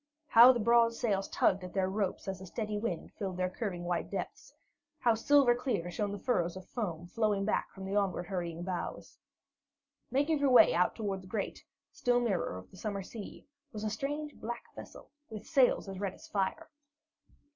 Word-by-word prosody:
How 235 +3 +9
the 245 - -1
broad 230 +1 +4
sails 200 -5 0
tugged 190 0 +2
at 180 - -8
their 190 -1 +2
ropes 195 0 -2
as 190 -1 -4
a 190 - -8
steady 215 +2 -3
wind 205 -6 -3
filled 190 -3 -3
their 185 0 0
curving 185 -5 -4
white 175 -1 -2
depths! - - -5 0.5
How 240 -5 +3
silver 260 +2 +5
clear 215 -8 -2
shone 205 +4 -2
the 205 - -4
furrows 185 -6 0
of 185 - -10
foam 175 -8 -4
flowing 205 +1 0
back 215 - 0
from 190 -1 -9
the 195 +1 -3
onward 195 -3 0
hurrying 175 -2 -4
bows! 180 -1 -5 0.9
Making 290 +3 +1
her 285 -1 +3
way 240 -8 +7
out 180 +2 +2
toward 200 -4 -3
the 185 - -14
great, 200 +1 -4 0.3
still 245 0 +1
mirror 195 - -1
of 90 - -12
the - - -14
summer 200 -1 -3
sea, 205 +1 -9 0.3
was 210 -1 -5
a 215 - -1
strange 290 +6 -3
black 235 +1 -7
vessel, - - -11 0.2
with 215 -2 -8
sails 265 -8 +3
as 190 -1 -6
red 195 -2 -3
as - - -14
fire. 205 +11 -2
205 Hz, 190 wpm, -32 LUFS, 185-235 Hz, 0.9 s, How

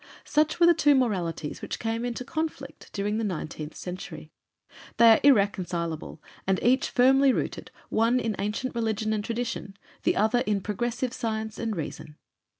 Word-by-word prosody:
Such 305 +2 +1
were 345 - +7
the 345 - +7
two 295 -3 +4
moralities 180 - -1
which - - -4
came 225 +1 -2
into 245 +1 -3
conflict 315 +3 -5
during 205 +2 -1
the - - -1
nineteenth 155 -5 -4
century. 180 0 -7 0.7
They 235 - +7
are 220 - +6
irreconcilable 180 - +1 0.2
and 190 -1 +2
each 255 +3 +3
firmly 270 +2 +5
rooted, - - -3 0.2
one 230 +3 +2
in 225 -3 -1
ancient 210 +6 -2
religion 220 -2 -1
and 210 -1 -1
tradition, 230 -3 -4 0.2
the - - +1
other 220 +3 +3
in 210 -4 0
progressive 240 +5 -2
science 220 -2 -3
and 225 -2 -2
reason. 150 -2 -6
220 Hz, 155 wpm, -27 LUFS, 200-245 Hz, 0.7 s, were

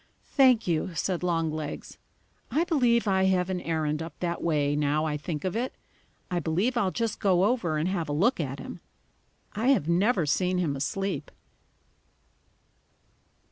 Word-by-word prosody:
"Thank 255 -5 +5
you," 170 +1 -1
said 180 +2 -1
Longlegs. 160 -4 -2 0.5
"I 300 +8 +2
believe 245 - +2
I 190 -1 +3
have 185 -1 +2
an 180 -1 -2
errand 155 -2 -1
up 165 -1 -8
that 170 -1 -2
way, 145 -3 +1
now 150 +1 +1
I 150 -1 -1
think 150 0 -4
of 185 - -1
it. 245 +3 -2 0.6
I 175 - +1
believe 185 +10 0
I'll 205 -6 +2
just 230 +3 -2
go 185 -2 +3
over 195 -8 +1
and 155 +3 0
have 175 -5 -2
a - - -1
look 195 - +2
at - - -3
him. - - -8 0.7
I 220 +4 -1
have 265 - +3
never 180 +1 +2
seen 180 +5 +1
him 165 -6 0
asleep." 195 +8 -2
180 Hz, 160 wpm, -27 LUFS, 155-210 Hz, 0.7 s, Thank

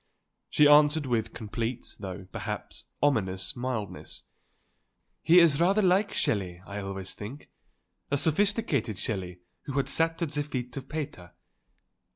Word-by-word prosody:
She 150 - +5
answered 150 +1 +6
with 115 -3 0
complete, 115 +2 -4
though 95 -1 -6
perhaps 105 -1 -6 0.2
ominous, 95 -10 0
mildness: 120 -4 -5 1.0
"He 170 - +5
is 165 -3 +5
rather 195 +4 +4
like 190 +3 +3
Shelley, 90 -5 -1
I 100 +1 -6
always 95 -1 -5
think, 120 +8 -9 0.6
a 140 - +1
sophisticated 160 - +1
Shelley 90 -4 -4 0.2
who 140 - -5
had 140 0 0
sat 165 0 0
at 155 - -2
the 145 - -1
feet 125 -4 -4
of 135 -1 -7
Pater. 145 - -6
125 Hz, 135 wpm, -28 LUFS, 105-150 Hz, 1.0 s, answered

